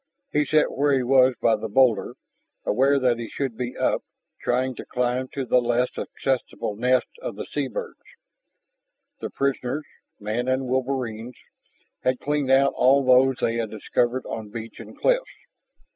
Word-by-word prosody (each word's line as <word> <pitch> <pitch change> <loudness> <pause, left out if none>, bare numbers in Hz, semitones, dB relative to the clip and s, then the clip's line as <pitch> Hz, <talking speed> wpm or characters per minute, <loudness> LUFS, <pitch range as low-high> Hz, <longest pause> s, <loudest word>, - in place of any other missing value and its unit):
He 150 0 +2
sat 155 -1 +3
where 145 +1 +2
he 130 -2 +2
was 130 0 +4
by 115 - +3
the 110 - -5
boulder, 120 -1 +3 0.5
aware 135 +5 +3
that 125 -3 +2
he 115 -2 -5
should 135 -5 -3
be 125 +1 -5
up, - - +1 0.4
trying 130 +1 0
to - - -6
climb 125 +1 -1
to 135 -2 -3
the 125 0 +3
less 120 +1 +1
accessible 130 -5 -3
nests 125 - +1
of - - -5
the - - -6
sea - - -2
birds. - - -6 1.2
The - - -4
prisoners, 140 +1 -2 0.3
man 110 +4 -2
and 130 +1 0
wolverines, 125 -3 -2 0.7
had 130 0 +1
cleaned 145 -2 -1
out 135 +1 +4
all 135 +2 +4
those 130 +1 +5
they 115 0 +1
had 115 -2 -2
discovered 120 +4 -1
on 110 -2 -6
beach 115 +1 -8
and - - -11
cliffs. - - +1
130 Hz, 160 wpm, -24 LUFS, 120-135 Hz, 1.2 s, those